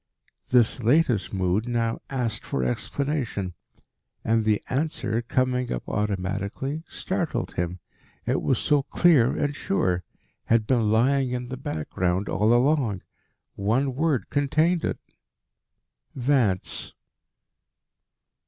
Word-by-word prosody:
This 125 Hz, 0 st, +3 dB
latest 120 Hz, -, +2 dB
mood 95 Hz, +3 st, 0 dB
now 115 Hz, -1 st, -1 dB
asked 120 Hz, -5 st, -2 dB
for 65 Hz, -, -2 dB
explanation. 115 Hz, -, -2 dB, 0.7 s
And 115 Hz, 0 st, +2 dB
the 105 Hz, -1 st, +2 dB
answer, 130 Hz, -6 st, -1 dB
coming 125 Hz, +1 st, 0 dB
up -, -, -4 dB
automatically, 100 Hz, +8 st, -2 dB
startled 185 Hz, -4 st, -3 dB
him. 85 Hz, +1 st, -2 dB, 0.5 s
It -, -, +1 dB
was -, -, +1 dB
so 145 Hz, -1 st, +2 dB
clear 140 Hz, -3 st, +3 dB
and 145 Hz, 0 st, -1 dB
sure 90 Hz, -, 0 dB, 0.4 s
had 115 Hz, -1 st, +3 dB
been 115 Hz, -3 st, +2 dB
lying 130 Hz, +4 st, +3 dB
in 125 Hz, 0 st, -4 dB
the 130 Hz, -, -4 dB
background 90 Hz, -, -2 dB
all 105 Hz, +3 st, +2 dB
along. 120 Hz, -5 st, +2 dB, 0.5 s
One 120 Hz, +7 st, 0 dB
word 145 Hz, -1 st, 0 dB
contained 155 Hz, +4 st, +2 dB
it: -, -, -1 dB, 1.2 s
Vance. 125 Hz, -8 st, 0 dB
120 Hz, 110 wpm, -25 LUFS, 100-140 Hz, 1.2 s, This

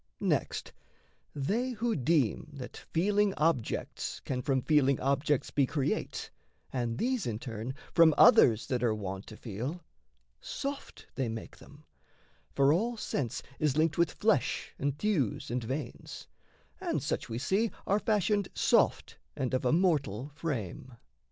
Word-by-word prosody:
Next, -, -, -1 dB, 0.6 s
they 220 Hz, -, -1 dB
who 230 Hz, 0 st, -1 dB
deem 145 Hz, -1 st, +1 dB
that 130 Hz, -3 st, -8 dB, 0.2 s
feeling 200 Hz, +3 st, +2 dB
objects 150 Hz, -7 st, -1 dB
can 125 Hz, -2 st, -3 dB
From 130 Hz, 0 st, 0 dB
feeling 140 Hz, -4 st, +3 dB
objects 140 Hz, +1 st, +1 dB
be 140 Hz, -2 st, +2 dB
create, 145 Hz, 0 st, -2 dB, 0.4 s
and 120 Hz, -3 st, -1 dB
these, 250 Hz, -, 0 dB
In 110 Hz, -3 st, -2 dB
turn, 115 Hz, +2 st, -5 dB, 0.2 s
from 165 Hz, -3 st, +6 dB
others 115 Hz, -2 st, +7 dB
that 125 Hz, -3 st, -1 dB
are 115 Hz, -3 st, +2 dB
wont 95 Hz, -1 st, -5 dB
to 110 Hz, -, -10 dB
feel 115 Hz, +3 st, -4 dB
When 175 Hz, +4 st, -7 dB, 0.6 s
soft 280 Hz, 0 st, -5 dB
they 130 Hz, -4 st, -1 dB
make 110 Hz, 0 st, -7 dB
them; 145 Hz, +1 st, -16 dB, 0.7 s
for 140 Hz, +1 st, +4 dB
all 230 Hz, +7 st, 0 dB
sense 135 Hz, -, -3 dB, 0.2 s
is 150 Hz, -2 st, +1 dB
linked 160 Hz, +1 st, +2 dB
With 170 Hz, -, +3 dB
flesh, 180 Hz, -, +1 dB
and 140 Hz, 0 st, -1 dB
thews, 155 Hz, -, 0 dB
and 125 Hz, 0 st, -1 dB
veins 130 Hz, +1 st, -5 dB, 0.5 s
and -, -, -2 dB
such, -, -, -2 dB
we 115 Hz, -, -3 dB
see, 195 Hz, -, +1 dB, 0.2 s
Are 200 Hz, +2 st, +2 dB
fashioned 210 Hz, -2 st, +1 dB
soft -, -, +2 dB, 0.2 s
and 130 Hz, -1 st, -2 dB
of 130 Hz, 0 st, 0 dB
a 125 Hz, -, +3 dB
mortal 145 Hz, -, +1 dB
frame. 130 Hz, -, -5 dB
140 Hz, 145 wpm, -30 LUFS, 125-170 Hz, 0.7 s, others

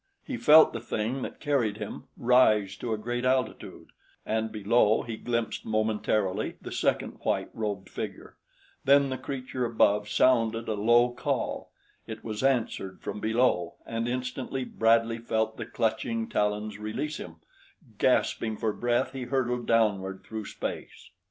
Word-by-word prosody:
He 265 Hz, -, -4 dB
felt 155 Hz, -8 st, +7 dB
the 115 Hz, -, -3 dB
thing 115 Hz, +3 st, -2 dB
that -, -, -6 dB
carried 125 Hz, -8 st, 0 dB
him 105 Hz, -2 st, -7 dB
rise 110 Hz, -5 st, +4 dB
to 120 Hz, -, -4 dB
a 110 Hz, -, 0 dB
greater 120 Hz, +3 st, -2 dB
altitude, 130 Hz, -3 st, -2 dB, 0.4 s
and 110 Hz, 0 st, -1 dB
below 110 Hz, +1 st, +3 dB
he 115 Hz, -1 st, -5 dB
glimpsed 115 Hz, 0 st, -2 dB
momentarily 110 Hz, -2 st, 0 dB
the -, -, -8 dB
second -, -, -1 dB
white -, -, -1 dB
robed 100 Hz, -4 st, -3 dB
figure; -, -, -7 dB, 0.5 s
then 140 Hz, 0 st, +5 dB
the 130 Hz, -, -2 dB
creature 130 Hz, -1 st, -4 dB
above 105 Hz, -3 st, +2 dB
sounded 115 Hz, -3 st, +2 dB
a 110 Hz, -, 0 dB
low 120 Hz, +4 st, +4 dB
call, -, -, -2 dB, 0.4 s
it 110 Hz, -1 st, -7 dB
was 110 Hz, -2 st, -4 dB
answered 120 Hz, -8 st, 0 dB
from -, -, -4 dB
below, 110 Hz, -5 st, +1 dB
and 115 Hz, +1 st, -2 dB
instantly 130 Hz, +1 st, -3 dB
Bradley 115 Hz, 0 st, +2 dB
felt 110 Hz, -1 st, -1 dB
the -, -, -5 dB
clutching 175 Hz, -, -1 dB
talons 105 Hz, -, -1 dB
release 135 Hz, +9 st, -3 dB
him; 80 Hz, -2 st, -8 dB, 0.6 s
gasping 110 Hz, -2 st, +1 dB
for 110 Hz, -2 st, -1 dB
breath, 120 Hz, +2 st, 0 dB
he 130 Hz, -2 st, -5 dB
hurtled 125 Hz, -2 st, -1 dB
downward 100 Hz, -4 st, +1 dB
through 110 Hz, -1 st, -6 dB
space. -, -, -6 dB
115 Hz, 145 wpm, -28 LUFS, 110-125 Hz, 0.6 s, felt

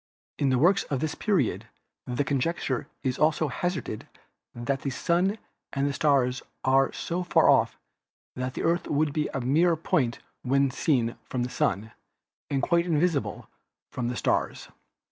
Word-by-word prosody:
In 140 Hz, -, +2 dB
the 130 Hz, -, +3 dB
works 180 Hz, +9 st, +4 dB
of 135 Hz, -, -2 dB
this 155 Hz, +2 st, -1 dB
period 190 Hz, -, 0 dB, 0.4 s
the 125 Hz, +3 st, 0 dB
conjecture 140 Hz, -1 st, -1 dB, 0.2 s
is 130 Hz, -2 st, -1 dB
also 155 Hz, 0 st, +2 dB
hazarded 155 Hz, -, -3 dB, 0.5 s
that 125 Hz, +3 st, -2 dB
the 140 Hz, -, -2 dB
Sun 175 Hz, -, +1 dB, 0.4 s
and 140 Hz, 0 st, 0 dB
stars 135 Hz, -4 st, +2 dB, 0.2 s
are 135 Hz, +1 st, +4 dB
so 175 Hz, +1 st, -3 dB
far 180 Hz, -, +3 dB
off -, -, +4 dB, 0.6 s
that 125 Hz, 0 st, -3 dB
the -, -, -3 dB
Earth 170 Hz, +2 st, +1 dB
would 150 Hz, 0 st, +1 dB
be 150 Hz, -1 st, 0 dB
a 135 Hz, -, -3 dB
mere 160 Hz, +7 st, +3 dB
point 135 Hz, -6 st, 0 dB, 0.2 s
when 135 Hz, +1 st, +2 dB
seen 125 Hz, -3 st, +1 dB
from 125 Hz, -2 st, -1 dB
the 125 Hz, -, -4 dB
Sun 110 Hz, +3 st, 0 dB, 0.6 s
and 135 Hz, -1 st, 0 dB
quite 170 Hz, 0 st, +2 dB
invisible 165 Hz, -2 st, 0 dB, 0.4 s
from 125 Hz, -2 st, -2 dB
the 120 Hz, -, -2 dB
stars. -, -, -1 dB
140 Hz, 155 wpm, -27 LUFS, 130-165 Hz, 0.6 s, works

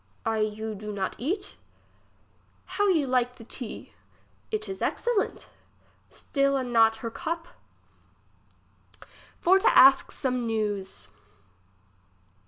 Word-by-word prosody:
I 225 Hz, -1 st, 0 dB
you 215 Hz, +1 st, -2 dB
do 210 Hz, +1 st, -7 dB
not 195 Hz, -2 st, -3 dB
eat? 325 Hz, -, -3 dB, 1.1 s
How 410 Hz, 0 st, 0 dB
you 325 Hz, -7 st, +3 dB
like 250 Hz, -1 st, 0 dB
the 230 Hz, -, -13 dB
tea. 235 Hz, 0 st, -7 dB, 0.6 s
It 430 Hz, -1 st, -3 dB
is 385 Hz, -, -7 dB
excellent. 475 Hz, -4 st, -1 dB, 0.6 s
Still 275 Hz, -1 st, 0 dB
a 265 Hz, -, -1 dB
not 225 Hz, -2 st, +4 dB
her 230 Hz, -, -3 dB
cup. 330 Hz, +6 st, -4 dB, 1.9 s
For 380 Hz, +2 st, +4 dB
to -, -, +3 dB
ask 270 Hz, +1 st, +7 dB
some 250 Hz, -2 st, -2 dB
neivs. 205 Hz, -, -3 dB
250 Hz, 110 wpm, -27 LUFS, 220-320 Hz, 1.9 s, ask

